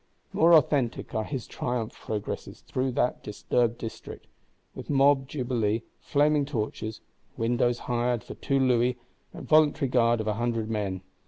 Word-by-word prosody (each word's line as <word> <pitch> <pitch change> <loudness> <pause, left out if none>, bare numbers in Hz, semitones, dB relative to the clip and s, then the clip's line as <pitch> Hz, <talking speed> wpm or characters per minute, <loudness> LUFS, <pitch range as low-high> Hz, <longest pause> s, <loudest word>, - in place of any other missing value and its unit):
More 170 +1 +6
authentic 140 -6 +1
are 110 - 0
his 130 -5 -4
triumph 120 -3 -3
progresses 105 -2 -5
through 130 0 -2
that 125 - 0
disturbed 115 +3 0
district, 110 -1 -8 0.5
with - - -9
mob 135 -1 +4
jubilee, 120 -5 -1 0.2
flaming 145 0 +2
torches, 110 -5 -4 0.4
"windows 120 +1 +1
hired 120 -1 0
for - - -8
two 140 - -1
louis," 125 -1 +2 0.3
and - - -10
voluntary 155 -2 +4
guard 120 -2 +3
of 110 - -2
a 105 - 0
hundred 115 -1 -2
men. 100 -4 -2
120 Hz, 145 wpm, -27 LUFS, 115-135 Hz, 0.5 s, More